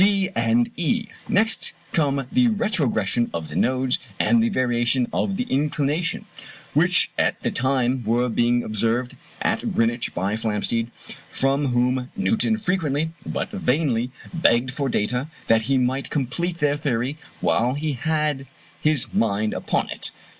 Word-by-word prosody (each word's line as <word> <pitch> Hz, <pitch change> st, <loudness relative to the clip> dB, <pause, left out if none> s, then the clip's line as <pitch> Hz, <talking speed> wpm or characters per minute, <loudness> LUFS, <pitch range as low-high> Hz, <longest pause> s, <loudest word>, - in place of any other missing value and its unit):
(d) 195 Hz, -1 st, +4 dB
and 115 Hz, +1 st, +2 dB
(e) 220 Hz, +7 st, 0 dB, 0.2 s
Next 220 Hz, +3 st, +1 dB, 0.2 s
come 140 Hz, -4 st, +1 dB
the 250 Hz, 0 st, +4 dB
retrogression 160 Hz, -, +1 dB
of 80 Hz, -2 st, -4 dB
the 75 Hz, -, -7 dB
nodes 130 Hz, +5 st, +1 dB, 0.2 s
and 235 Hz, -, +4 dB
the 230 Hz, -, +2 dB
variation 120 Hz, -, +1 dB
of 195 Hz, -1 st, 0 dB
the -, -, 0 dB
inclination, 150 Hz, -, -1 dB, 0.5 s
which -, -, +4 dB
at -, -, +1 dB
the -, -, 0 dB
time 130 Hz, -1 st, +1 dB
were 120 Hz, +3 st, +1 dB
being 120 Hz, +1 st, +2 dB
observed 115 Hz, +3 st, -1 dB, 0.3 s
at -, -, 0 dB
Greenwich 115 Hz, +1 st, 0 dB
by 95 Hz, +3 st, -1 dB
Flamsteed, 110 Hz, +1 st, -1 dB, 0.4 s
from 135 Hz, +2 st, +1 dB
whom 125 Hz, +1 st, +1 dB
Newton 220 Hz, +2 st, +1 dB
frequently, 160 Hz, -7 st, 0 dB, 0.2 s
but -, -, -3 dB
vainly, 135 Hz, -, 0 dB, 0.2 s
begged 125 Hz, -7 st, +3 dB
for 140 Hz, 0 st, -2 dB
data 125 Hz, +6 st, -1 dB, 0.2 s
that 115 Hz, 0 st, +4 dB
he 135 Hz, -, +4 dB
might 130 Hz, +2 st, 0 dB
complete 165 Hz, +6 st, -2 dB
their 145 Hz, -2 st, +1 dB
theory 135 Hz, 0 st, -1 dB, 0.2 s
while 125 Hz, +3 st, +1 dB
he 150 Hz, +1 st, -1 dB
had 150 Hz, 0 st, -1 dB, 0.3 s
his 150 Hz, -4 st, +1 dB
mind 110 Hz, -1 st, +1 dB
upon -, -, -1 dB
it. -, -, -2 dB
130 Hz, 145 wpm, -23 LUFS, 120-160 Hz, 0.5 s, d